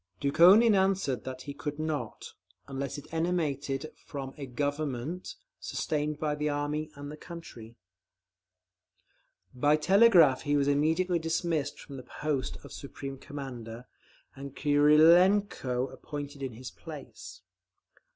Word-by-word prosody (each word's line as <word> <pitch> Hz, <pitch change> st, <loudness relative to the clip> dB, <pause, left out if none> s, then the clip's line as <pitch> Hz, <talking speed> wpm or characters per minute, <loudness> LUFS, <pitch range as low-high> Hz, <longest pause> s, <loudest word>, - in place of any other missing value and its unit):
Dukhonin 185 Hz, -, +6 dB
answered 190 Hz, -9 st, +1 dB
that 130 Hz, 0 st, -6 dB
he 140 Hz, -, -6 dB
could 145 Hz, 0 st, -5 dB
not, 155 Hz, -1 st, -4 dB, 0.3 s
unless 135 Hz, +1 st, -4 dB
it 145 Hz, +2 st, -11 dB
emanated 155 Hz, -4 st, -1 dB
from 135 Hz, -2 st, -6 dB
"a 140 Hz, -2 st, -7 dB
Government 145 Hz, +4 st, -3 dB, 0.2 s
sustained 150 Hz, 0 st, -2 dB
by 150 Hz, -1 st, -1 dB
the 150 Hz, 0 st, -1 dB
Army 145 Hz, +1 st, -2 dB
and 145 Hz, 0 st, -8 dB
the 150 Hz, -, -9 dB
country." 125 Hz, -10 st, -10 dB, 1.8 s
By 145 Hz, +4 st, +3 dB
telegraph 175 Hz, -, +5 dB
he 145 Hz, -1 st, +1 dB
was 140 Hz, -1 st, +1 dB
immediately 160 Hz, +5 st, +2 dB
dismissed 160 Hz, -2 st, -1 dB
from 140 Hz, -, -10 dB
the 130 Hz, -, -11 dB
post 145 Hz, -4 st, -1 dB
of -, -, -11 dB
Supreme 135 Hz, -1 st, -7 dB
Commander, 125 Hz, -5 st, -8 dB, 0.5 s
and 140 Hz, 0 st, -9 dB
Krylenko 150 Hz, -2 st, +4 dB
appointed 145 Hz, -1 st, -7 dB
in 130 Hz, -3 st, -4 dB
his 125 Hz, +2 st, -8 dB
place. -, -, -10 dB
145 Hz, 120 wpm, -29 LUFS, 135-160 Hz, 1.8 s, Dukhonin